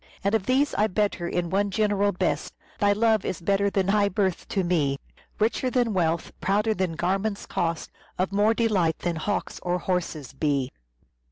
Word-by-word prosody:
All 200 - +3
these 255 +7 +2
I 210 - +2
better 200 -3 -1
in 175 -1 -2
one 200 +1 +1
general 205 0 +1
best, 185 -1 -2 0.2
Thy 205 0 +4
love 220 0 +3
is 185 - -3
better 200 +3 +1
than 195 -1 0
high 205 0 +3
birth 195 -3 -1
to 195 - 0
me, 155 -6 +1 0.4
Richer 230 +4 +1
than 245 -3 +1
wealth, 170 -3 0
prouder 210 +3 +2
than 185 -4 -1
garments' 195 +5 -1
cost, 165 -1 -2 0.3
Of 185 +2 0
more 210 +3 +3
delight 195 -9 +2
than 175 -2 -2
hawks 205 +6 -2
or 180 0 0
horses 170 -7 -3
be." 140 -2 0
195 Hz, 170 wpm, -26 LUFS, 175-210 Hz, 0.4 s, Thy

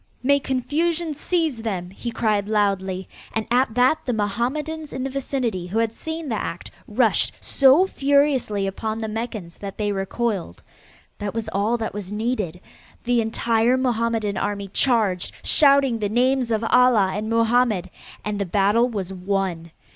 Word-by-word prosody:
"May 280 +2 +4
confusion 310 +6 -1
seize 315 -3 -1
them," 190 -6 -4
he 235 +5 -6
cried 210 -3 0
loudly, 195 -3 0 0.3
and 220 -1 -1
at 245 -2 +2
that 255 +5 +4
the 250 - 0
Mohammedans 260 +10 -2
in 260 - -3
the 270 - -3
vicinity 245 -9 -2
who 195 +5 -3
had 225 -1 +1
seen 320 +4 -5
the 225 -5 -2
act, 170 - -6 0.2
rushed 225 +1 +2
so 275 +7 +5
furiously 280 - +1
upon 215 +3 -3
the 225 -1 -3
Meccans 215 -5 -5
that 200 -1 -7
they 210 -1 0
recoiled. 195 - -3 0.6
That 205 +1 -4
was 225 -1 -3
all 210 +4 0
that 225 -1 -4
was 200 -1 -6
needed. 210 -6 -2 0.4
The 245 -1 +2
entire 230 +2 +1
Mohammedan 230 -4 0
army 200 -1 -2
charged, 210 -7 +1
shouting 275 -5 +4
the 205 -2 -1
names 250 +2 +2
of 220 0 0
Allah 245 -6 +5
and 210 +2 -3
Mohammed, 230 -4 +2 0.3
and 210 -1 -2
the 200 - 0
battle 205 +6 +3
was 195 -5 -4
won. 185 -3 -2
225 Hz, 155 wpm, -23 LUFS, 200-255 Hz, 0.6 s, so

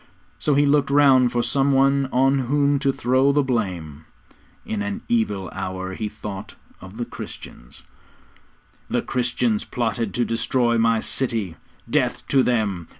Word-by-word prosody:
So 150 - +1
he 145 +1 +4
looked 145 0 +2
round 135 -3 +5
for 120 -1 0
some 140 +2 +1
one 135 0 +3
on 135 +2 +3
whom 145 0 +2
to 140 -1 +1
throw 130 +2 +2
the 145 0 +2
blame. 90 - -3 0.6
In 105 -2 -3
an 100 0 -4
evil 105 -5 0
hour 95 0 -5
he 105 +2 -4
thought 105 -2 -8 0.3
of 95 +4 -11
the 120 - -3
Christians. - - -10 1.1
'The - - 0
Christians 120 -3 -1
plotted 115 -3 -2
to 120 - +1
destroy 120 +1 +1
my 115 -1 +2
city 115 -10 -1 0.3
death - - -1
to 135 - +4
them! 105 -9 0
120 Hz, 150 wpm, -22 LUFS, 105-135 Hz, 1.1 s, round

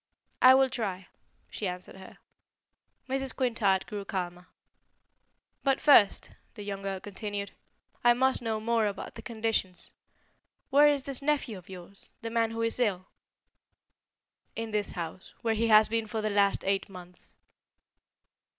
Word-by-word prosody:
"I 255 +1 +9
will 265 0 +5
try," 195 -7 -4 0.4
she 205 - -3
answered 180 +1 -7
her. 190 - -13 0.9
Mrs. 270 0 -2
Quintard 225 -7 +1
grew 205 -2 -6
calmer. 180 -2 -5 1.2
"But, 270 -1 +2
first," 230 -9 +5 0.2
the 210 - -8
young 200 -1 -5
girl 195 -1 -3
continued, 205 +1 -5 0.5
"I 240 0 +7
must 260 +1 +2
know 225 -2 -2
more 225 0 +1
about 200 - -6
the 225 - -9
conditions. 220 -5 -3 0.8
Where 290 +2 +7
is 285 -2 +2
this 275 -1 -3
nephew 280 -6 0
of 185 -1 -13
yours 185 +1 -10
the 230 - -4
man 230 -1 +1
who 225 0 -3
is 230 +2 0
ill?" 190 -6 0 1.5
"In 225 -1 -4
this 210 -1 -1
house, 170 +2 -7
where 225 -1 +2
he 225 +1 +1
has 215 -1 +7
been 225 0 -1
for 220 0 -3
the 215 - 0
last 200 -1 +2
eight 195 +1 0
months." 180 -1 -14
215 Hz, 150 wpm, -29 LUFS, 195-235 Hz, 1.5 s, I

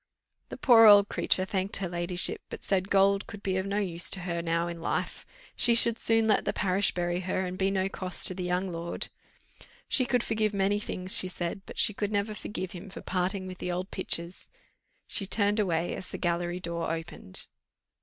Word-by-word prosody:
The - - -7
poor 230 -4 +7
old 205 -1 +8
creature 185 - +1
thanked 190 +1 -2
her 195 - -3
ladyship, 175 +1 +1
but - - -8
said 190 0 0
gold 195 0 +3
could 205 - -10
be 190 -1 -1
of 190 +1 -2
no 200 +1 -1
use 175 -4 0
to 195 - +4
her 170 -1 -3
now 170 0 0
in 170 -1 -6
life; - - -3 0.3
she 235 -1 +4
should 230 0 +2
soon 225 -1 +3
let 215 - +3
the - - -1
parish 190 +1 +1
bury 175 0 -1
her, 185 +1 -2
and 180 0 -4
be 190 +1 +1
no 190 -1 0
cost 185 -1 -1
to - - -1
the 185 - -6
young 180 +2 -1
lord. 170 -1 -4 0.8
She 255 - +2
could 245 -2 +1
forgive 215 -2 0
many 200 +1 +1
things, 185 -2 0
she 185 - +3
said, 180 +1 -4
but - - -10
she 210 - +4
could 205 +1 -3
never 205 +1 -1
forgive 190 -3 -5
him 190 +2 -9
for - - -9
parting 185 +1 -2
with 185 -1 -8
the 180 - -3
old 180 +2 -4
pictures. 175 -2 -3 0.6
She 195 - +2
turned 205 +1 +2
away 175 -4 0
as 185 - -7
the - - -5
gallery 175 0 -1
door 170 -2 -3
opened. 165 - -5
185 Hz, 210 wpm, -28 LUFS, 175-200 Hz, 0.8 s, old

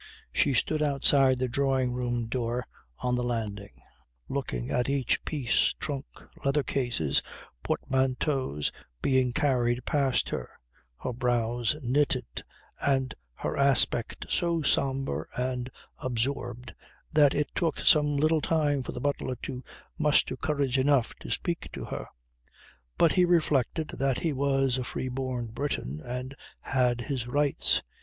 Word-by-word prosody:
She 140 -3 +2
stood 155 +6 +1
outside 140 -2 +4
the 130 0 0
drawing 130 0 +1
room 120 -1 -1
door 120 +1 -2 0.4
on 125 - 0
the 125 0 +1
landing, 105 -4 -4 0.4
looking 85 - -3
at 125 +2 +1
each 140 -3 +1
piece, 140 -7 +1
trunk, 140 -3 -3 0.4
leather 140 +1 +2
cases, 120 - 0 0.4
portmanteaus, 130 - 0 0.3
being 130 -2 +3
carried 120 -2 +1
past 135 -4 +1
her, - - -4 0.5
her 125 - -2
brows 120 +1 0
knitted 130 -1 +1 0.4
and 135 -2 +1 0.2
her - - -3
aspect 135 -4 +2
so 170 -2 +1
sombre 135 -1 0
and 125 0 -1 0.3
absorbed 125 0 -2 0.4
that 145 -2 +5
it 150 0 0
took 165 -4 0
some 150 -1 +4
little 155 +2 +3
time 145 -4 +1
for - - -6
the - - -5
butler 140 -2 -1
to 125 0 -5 0.4
muster 150 -3 +3
courage 140 -2 0
enough 135 -3 +3
to - - -9
speak 170 -1 -2
to - - -5
her. - - -5 0.9
But 165 - +5
he 180 - +4
reflected 155 -4 +2
that 135 -2 +2
he 160 -3 0
was 135 -1 +1
a - - -2
free 130 +1 -4
born 125 -2 -3
Briton 110 - -3
and 125 +2 -5 0.3
had 125 -2 +1
his 125 -2 -3
rights. 145 +2 +1
130 Hz, 135 wpm, -28 LUFS, 125-140 Hz, 0.9 s, that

